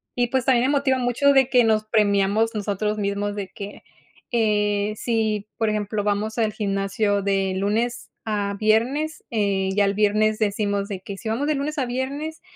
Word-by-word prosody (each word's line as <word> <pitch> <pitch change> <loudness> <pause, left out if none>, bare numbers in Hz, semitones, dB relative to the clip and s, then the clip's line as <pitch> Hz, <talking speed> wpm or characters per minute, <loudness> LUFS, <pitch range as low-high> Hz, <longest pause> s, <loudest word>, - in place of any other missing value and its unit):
Y 245 -1 +1
pues 255 +1 -1
también 255 -2 +3
me 285 +1 +2
motiva 265 -2 +1
mucho 245 +3 +3
de 265 -1 +4
que 250 -2 +5
nos 220 -1 +2
premiamos 210 0 +2
nosotros 210 0 -2
mismos 205 0 -2
de 200 -2 -4
que, 200 +1 -9 0.5
eh, 210 -2 +1
si, 215 -2 -1
por 225 -1 +1
ejemplo, 210 0 -2
vamos 210 +2 -1
al 220 -2 +1
gimnasio 200 0 0
de 195 -1 0
lunes 220 +5 -1
a 205 -2 -1
viernes, 250 +9 +1
eh, 200 -3 0
ya 205 0 +4
el 200 0 0
viernes 215 +1 +2
decimos 205 -1 0
de 195 -3 -6
que: 195 +1 -7
"Si 220 - -8
vamos 245 +6 -1
de 305 - +1
lunes 295 +3 -3
a 265 - +1
viernes, 280 +6 -4
215 Hz, 180 wpm, -23 LUFS, 205-240 Hz, 0.5 s, que